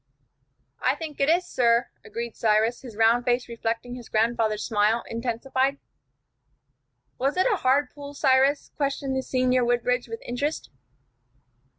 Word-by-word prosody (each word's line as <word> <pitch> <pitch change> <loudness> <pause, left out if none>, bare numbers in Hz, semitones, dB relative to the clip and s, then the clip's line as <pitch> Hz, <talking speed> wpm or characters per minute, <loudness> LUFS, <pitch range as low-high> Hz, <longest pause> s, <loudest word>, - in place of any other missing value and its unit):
"I - - +3
think 315 -3 -7
it 280 +1 +2
is, 350 +2 +3
sir," 235 -7 +2
agreed 235 -1 -6
Cyrus, 220 +2 +2
his 240 -5 -10
round 225 +2 +4
face 245 0 0
reflecting 235 +1 -3
his 245 -2 -9
grandfather's 220 -1 +1
smile, 220 +1 +1
intensified. 260 +4 -1 1.4
"Was 275 +6 0
it 370 - +3
a - - 0
hard 270 -1 +2
pull, 285 0 -9
Cyrus?" 270 +1 +2
questioned 275 -1 -1
the 265 - 0
senior 255 -1 +1
Woodbridge 245 +1 +1
with 230 0 -7
interest. 285 +6 -3
245 Hz, 135 wpm, -25 LUFS, 230-275 Hz, 1.4 s, round